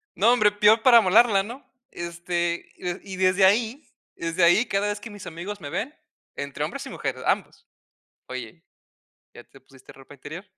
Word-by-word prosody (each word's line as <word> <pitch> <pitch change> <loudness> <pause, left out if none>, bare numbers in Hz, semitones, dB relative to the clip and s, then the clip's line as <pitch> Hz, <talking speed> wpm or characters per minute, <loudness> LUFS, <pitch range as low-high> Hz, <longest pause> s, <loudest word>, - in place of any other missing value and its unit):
No, 225 +5 +4
hombre, 215 -4 +4
peor 210 +2 +4
para 245 -1 +7
amolarla, 210 0 +5
¿no? 240 +7 -9 0.3
Este, 170 0 -3
y 185 +2 -6
desde 185 +1 +3
ahí 230 +8 +1 0.3
desde 165 +2 -1
ahí, 175 +8 +5
cada 200 -3 -1
vez 205 0 -3
que 215 +1 -10
mis 205 -3 -10
amigos 180 +5 -7
me 145 - -7
ven, 240 - -4 0.4
entre 140 -1 -5
hombres - - -5
y - - -8
mujeres, - - -4
ambos: - - -2 0.6
"Oye, 130 +5 -8 0.7
¿ya - - -13
te - - -19
pusiste 135 -1 -18
ropa 135 +1 -15
interior?" 155 +7 -9
190 Hz, 170 wpm, -24 LUFS, 170-210 Hz, 0.7 s, para